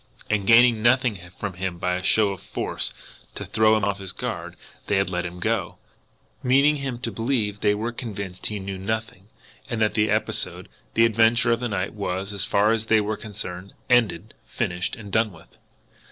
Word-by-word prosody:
And, 100 -2 0
gaining 115 -1 +6
nothing 120 -3 +3 0.2
from 100 -3 -4
him 90 0 -4
by 90 +1 -1
a 90 - -1
show 105 +2 +3
of 95 -3 -6
force, - - -3 0.4
to - - -5
throw 110 0 +4
him 105 - -2
off 100 -1 -1
his 95 -1 -5
guard, 85 -8 -5 0.3
they 105 - +2
had 95 -1 +1
let 90 0 -1
him 90 0 -6
go - - -1 0.6
meaning 140 +4 +4
him 135 -3 -4
to 115 - -2
believe 115 -4 -1
they 105 -1 +2
were 110 +3 -2
convinced 100 -6 -5
he 105 -1 -3
knew 95 0 -5
nothing, 110 -1 -4 0.4
and 115 - -2
that 110 -1 +2
the 105 0 +2
episode, - - -2 0.3
the 115 - +6
adventure 115 +2 +4
of 115 - +2
the 120 0 -2
night, 100 -2 -2
was, 100 -1 -3
as 100 - 0
far 105 +2 +3
as 110 -1 0
they 110 -1 +5
were 105 +1 -1
concerned, 100 -3 -7 0.2
ended, 110 -4 +2
finished, 90 -6 -2
and 105 -3 -10
done 110 +1 +2
with! 80 -2 -16
105 Hz, 195 wpm, -24 LUFS, 95-115 Hz, 0.6 s, gaining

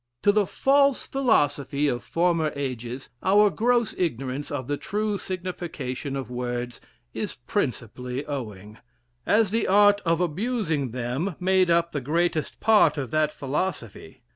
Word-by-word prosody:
To 205 - +6
the 205 -2 +2
false 275 -1 +3
philosophy 145 - +1
of 120 -3 -1
former 165 -2 +1
ages, 130 -2 -5
our 205 +2 +4
gross 235 +5 +1
ignorance 135 -4 -2
of 140 -3 -4
the 145 - 0
true 210 +5 -2
signification 170 -8 -5
of 130 -3 -5
words 120 0 -4 0.3
is - - -4
principally 125 +2 -3
owing; 105 -7 -6 0.5
as 210 -2 +3
the 225 +1 0
art 205 +1 +5
of 165 -1 +1
abusing 175 - -1
them 130 - -3
made 185 0 +3
up 170 0 +2
the 145 - -3
greatest 160 +3 -1
part 210 -9 +4
of 135 -5 -4
that 155 -1 +2
philosophy. 140 - -4
155 Hz, 140 wpm, -25 LUFS, 130-195 Hz, 0.5 s, To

